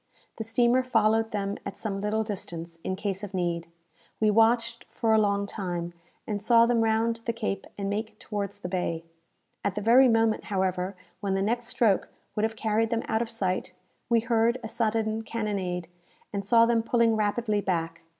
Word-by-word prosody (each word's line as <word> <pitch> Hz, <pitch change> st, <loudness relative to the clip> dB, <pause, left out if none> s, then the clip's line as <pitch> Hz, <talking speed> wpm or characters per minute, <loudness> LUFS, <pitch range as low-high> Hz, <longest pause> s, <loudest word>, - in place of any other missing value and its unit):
The 220 Hz, -, -3 dB
steamer 240 Hz, +3 st, +3 dB
followed 225 Hz, -3 st, +2 dB
them 200 Hz, -2 st, -3 dB
at 200 Hz, -, -6 dB
some 195 Hz, -3 st, -3 dB
little 215 Hz, +2 st, 0 dB
distance, 170 Hz, -5 st, -6 dB
in 185 Hz, -, -2 dB
case 195 Hz, 0 st, -3 dB
of 200 Hz, -1 st, -6 dB
need. 170 Hz, -2 st, -1 dB, 0.5 s
We 215 Hz, -1 st, +4 dB
watched 230 Hz, +2 st, +2 dB
for 225 Hz, -2 st, +1 dB
a 220 Hz, -, +5 dB
long 200 Hz, -1 st, +2 dB
time, 175 Hz, -4 st, -4 dB, 0.3 s
and 205 Hz, -2 st, -3 dB
saw 230 Hz, +2 st, +6 dB
them 235 Hz, -1 st, +2 dB
round 225 Hz, +1 st, +1 dB
the 230 Hz, -, 0 dB
cape 215 Hz, -4 st, -3 dB
and 200 Hz, -1 st, -3 dB
make 215 Hz, +2 st, -3 dB
towards 200 Hz, -2 st, -4 dB
the 200 Hz, -, -6 dB
bay. 175 Hz, -3 st, -2 dB, 0.6 s
At 200 Hz, -, -1 dB
the 210 Hz, -, -2 dB
very 245 Hz, +5 st, +6 dB
moment, 225 Hz, -2 st, +2 dB
however, 190 Hz, -1 st, -1 dB, 0.2 s
when 195 Hz, -1 st, -1 dB
the 195 Hz, -, 0 dB
next 235 Hz, +3 st, -1 dB
stroke 220 Hz, -5 st, +2 dB, 0.3 s
would 210 Hz, -, 0 dB
have 220 Hz, +1 st, 0 dB
carried 220 Hz, 0 st, +1 dB
them 230 Hz, -1 st, -1 dB
out 220 Hz, -, +1 dB
of 235 Hz, -, -2 dB
sight, 185 Hz, -5 st, -2 dB, 0.4 s
we 230 Hz, -1 st, +4 dB
heard 230 Hz, +1 st, +2 dB
a -, -, -3 dB
sudden 220 Hz, -1 st, 0 dB
cannonade, 200 Hz, -6 st, -3 dB, 0.5 s
and 200 Hz, -1 st, -2 dB
saw 230 Hz, +3 st, +5 dB
them 230 Hz, -1 st, +2 dB
pulling 230 Hz, -1 st, +2 dB
rapidly 215 Hz, 0 st, 0 dB
back. 165 Hz, -3 st, -2 dB
215 Hz, 185 wpm, -27 LUFS, 195-230 Hz, 0.6 s, saw